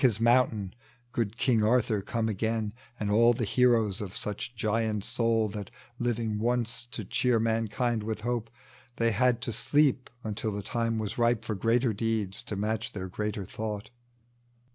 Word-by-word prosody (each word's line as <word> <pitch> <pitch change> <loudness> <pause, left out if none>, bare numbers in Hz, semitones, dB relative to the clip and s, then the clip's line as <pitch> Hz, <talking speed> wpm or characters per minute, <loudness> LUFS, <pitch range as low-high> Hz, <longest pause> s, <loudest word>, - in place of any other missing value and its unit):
His 125 -7 +4
moimtaiii, 115 -4 +3 0.4
good 115 -2 -2
King 120 -4 +3
Arthur 110 -2 +2
come 115 +3 -1
again, 110 0 -1 0.3
And 105 -1 -1
all 115 +3 +6
the 120 0 -2
heroes 115 -3 +3
of 100 -2 -5
such 105 +4 -4
giant 110 -1 0
aoul 115 -1 +2
That, 105 -3 -5 0.3
living 115 -3 -1
once 120 0 0
to 115 -3 -4
cheer 120 +4 +2
mankind 115 +1 0
with 110 0 -4
hope, 120 -1 -2 0.5
They 115 0 +2
had 120 +2 +2
to 120 - -2
sleep 135 +3 +2
until 110 0 -2
the 100 0 -4
time 115 +1 -1
was 110 +1 -3
ripe 115 -2 +2
For 110 - -2
greater 115 +4 +2
deeds 110 -2 0
to 105 - -4
naatch 110 +2 -2
their 95 -2 -5
greater 105 +1 -3
thought. 105 +1 -5
110 Hz, 165 wpm, -29 LUFS, 105-120 Hz, 0.5 s, all